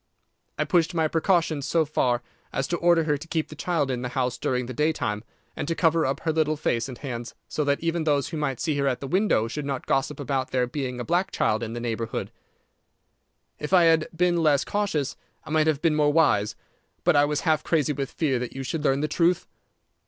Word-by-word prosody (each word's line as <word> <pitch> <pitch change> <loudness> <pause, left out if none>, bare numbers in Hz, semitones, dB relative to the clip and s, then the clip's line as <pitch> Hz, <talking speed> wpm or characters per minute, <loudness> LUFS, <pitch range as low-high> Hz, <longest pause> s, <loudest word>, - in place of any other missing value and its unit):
I - - +2
pushed 170 -2 +1
my 160 -1 +2
precautions 165 -3 +1
so 165 -2 +2
far 125 -5 0 0.3
as 135 - -1
to 175 - 0
order 170 -1 +4
her 150 -2 +1
to 165 - -10
keep 160 -1 -2
the 155 - -9
child 155 -3 0
in 125 -1 -2
the 125 - -3
house 125 -1 -1
during 125 -1 -1
the 130 - -6
daytime, 120 -8 0 0.3
and - - -4
to 165 - 0
cover 165 -2 +3
up 135 - -2
her 160 - 0
little 155 -1 +1
face 120 -4 -1
and 125 - -7
hands 120 -4 -6
so 150 - -1
that 140 0 +1
even 165 0 0
those 145 -3 +1
who 165 - -4
might 135 -5 -2
see 160 -3 0
her 140 - +1
at 125 -2 0
the - - -6
window 180 - +2
should 150 +6 -4
not 140 -2 -3
gossip 135 +2 0
about 135 -2 -1
there 125 -1 +1
being 125 -1 -4
a - - -2
black 180 +3 +1
child 110 +1 0
in 115 -1 -4
the 120 - -4
neighbourhood. 115 -1 -3 1.3
If 150 +5 -4
I 180 -2 +7
had 160 -1 +4
been 175 +1 +2
less 150 -4 +3
cautious 200 -10 -1 0.3
I - - -9
might 155 0 +3
have 155 -1 +1
been 165 -2 +4
more 150 -1 +3
wise, 145 -10 +3 0.5
but - - +4
I 145 0 +6
was 150 0 -1
half 155 -3 +1
crazy 150 -3 +1
with 140 -1 -3
fear 135 -6 0
that 125 -1 -5
you 135 - -4
should 150 +3 -3
learn 135 -1 +2
the 155 - +1
truth. 170 +3 +1
150 Hz, 230 wpm, -25 LUFS, 130-165 Hz, 1.3 s, I